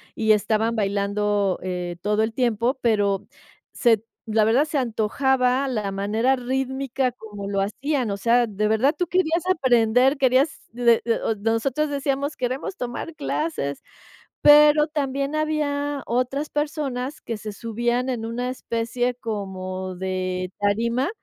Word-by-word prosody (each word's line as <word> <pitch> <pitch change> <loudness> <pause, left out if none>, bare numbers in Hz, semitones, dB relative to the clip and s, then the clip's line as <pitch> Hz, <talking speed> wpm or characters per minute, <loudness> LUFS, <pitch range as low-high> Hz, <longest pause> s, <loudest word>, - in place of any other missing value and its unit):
y 220 -1 +2
estaban 220 +2 +2
bailando, 200 -1 0
eh, 180 -1 -4
todo 210 +2 +1
el 220 0 -2
tiempo, 240 +1 0
pero 205 -3 +1 0.5
se 225 -4 +3 0.3
la 215 0 +3
verdad, 235 +7 +3
se 300 -1 -2
antojaba 255 +2 +1
la 215 -5 -2
manera 215 +7 +1
rítmica 265 0 -2
como 210 -4 -8
lo 200 -1 0
hacían, 255 +4 -1
o 200 - -2
sea, 235 +4 +3
de 210 -1 -1
verdad 220 +7 +3
tú 355 - 0
querías 345 -1 +1
aprender, 255 -3 +3
querías, 265 +2 +1
eh, 235 -1 +4
eh, 230 -1 +1 0.2
nosotros 230 +7 0
decíamos: 280 0 -1
"Queremos 255 +8 -3
tomar 250 +4 -5
clases", 295 - -3 0.6
pero 300 +1 +7
también 280 -1 -2
había 290 -2 -1
otras 255 +5 -1
personas 290 -3 -3
que 230 - -5
se 210 0 -7
subían 240 +4 -1
en 235 -3 -2
una 245 +2 -3
especie 245 0 -2
como 190 -5 -5
de 185 0 -3
tarima, 230 +7 +1
240 Hz, 135 wpm, -23 LUFS, 210-275 Hz, 0.6 s, pero